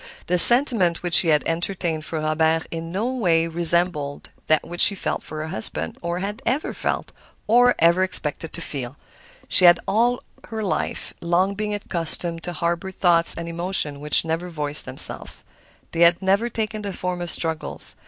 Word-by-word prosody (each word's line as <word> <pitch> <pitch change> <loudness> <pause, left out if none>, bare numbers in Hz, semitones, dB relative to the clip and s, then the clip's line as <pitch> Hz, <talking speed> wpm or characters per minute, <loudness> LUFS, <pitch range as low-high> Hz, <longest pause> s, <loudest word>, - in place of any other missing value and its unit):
The 180 0 +1
sentiment 230 -8 +7
which 175 -1 -4
she 165 0 +4
entertained 165 +1 -2
for 160 - -4
Robert 160 +1 0
in 165 0 -6
no 220 +8 -2
way 170 -9 +1
resembled 165 -3 -1 0.2
that 155 -1 +1
which 175 +1 -2
she 200 - +5
felt - - -3
for 155 -1 -7
her 155 - -6
husband, 80 - -3
or 170 +1 -3
had 205 +2 -5
ever 265 +6 -2
felt, - - -3 0.3
or 245 +3 +4
ever 170 +3 +3
expected 165 -4 -1
to 170 - -6
feel. 135 -4 -7 0.5
She 185 - +5
had 175 0 +7
all 240 +3 0 0.2
her 220 -1 -5
life 195 - -4
long 175 +3 0
been 210 +1 -4
accustomed 170 -3 -1
to 175 - -5
harbor 170 +3 -3
thoughts 175 -3 +3
and 170 0 -6
emotions 170 -4 -2
which 150 +2 +2
never 165 +2 -3
voiced 150 -3 -4
themselves. - - -3 0.5
They 165 - -5
had 170 0 +5
never 200 +5 0
taken 215 -2 -4
the 200 -2 -5
form 180 0 -4
of 175 - -5
struggles. 160 -1 -3
170 Hz, 175 wpm, -22 LUFS, 160-195 Hz, 0.5 s, sentiment